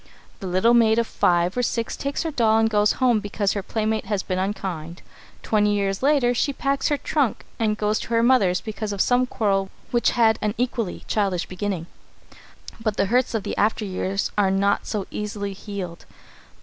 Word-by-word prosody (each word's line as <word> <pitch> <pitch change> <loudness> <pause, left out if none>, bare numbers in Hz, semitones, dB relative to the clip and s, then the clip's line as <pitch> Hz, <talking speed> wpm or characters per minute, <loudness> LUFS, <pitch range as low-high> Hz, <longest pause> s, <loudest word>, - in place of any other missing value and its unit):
The 195 - -6
little 185 +6 +3
maid 225 -2 +4
of 235 - +2
five 175 -3 +1
or 250 - +1
six 230 -1 -2
takes 280 +4 -3
her 325 - -2
doll 225 -6 +3
and 225 0 +3
goes 210 -1 +3
home 245 -4 +2
because 205 -1 -1
her 200 - -2
playmates 220 +1 -2
have 205 -2 -2
been 185 -1 -1
unkind. 185 -4 -4 0.4
Twenty 210 -1 +2
years 195 -1 -1
later 270 -3 +3
she 280 +4 0
packs 275 0 0
her 295 - +1
trunk 280 -5 -1
and 215 -2 +1
goes 210 +1 0
to - - -6
her 230 0 +2
mother's 205 -8 +3
because 215 -1 -5
of 200 - -6
some 250 +4 +3
quarrel 195 -5 0 0.2
which 240 -1 +3
had 220 -2 +4
an 210 +1 -1
equally 240 -5 -2
childish 195 -5 0
beginning. 185 -2 -4 1.0
But 215 -2 -1
the - - +2
hurts 250 -1 +2
of 215 - -1
the - - -4
after 215 +1 +1
years 195 +1 -2
are 195 -2 +3
not 200 +1 +1
so 205 -3 -2
easily 205 -1 -4
healed. 190 -4 -7
210 Hz, 190 wpm, -23 LUFS, 195-235 Hz, 1.0 s, maid